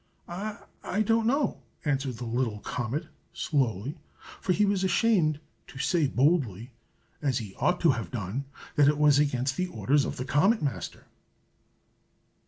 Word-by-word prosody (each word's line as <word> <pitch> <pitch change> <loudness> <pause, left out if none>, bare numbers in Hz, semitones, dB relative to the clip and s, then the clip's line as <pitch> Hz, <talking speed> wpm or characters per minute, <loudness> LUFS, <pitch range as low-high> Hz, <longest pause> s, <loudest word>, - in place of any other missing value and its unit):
"I 205 +2 -4
don't 225 +1 +2
know!" 280 +3 +1 0.2
answered 135 -3 0
the 120 +2 -6
little 115 -2 -1
comet, 125 - -3 0.3
slowly, 135 - -1 0.4
for 185 - 0
he 210 +3 +3
was 200 -1 +1
ashamed 185 -6 +3 0.3
to - - -12
say 150 +2 +2
boldly, 130 - +1 0.5
as 135 -5 +1
he 105 -4 -5
ought 180 0 +2
to 165 - +6
have 115 -4 -3
done, 120 +3 -4 0.3
that 145 -1 +6
it 150 0 +3
was 145 -1 +5
against 130 -2 +1
the 185 - 0
orders 145 -5 +1
of - - -4
the 125 - -3
Comet 190 - +3
Master. 120 -11 -4
145 Hz, 150 wpm, -28 LUFS, 125-180 Hz, 0.5 s, to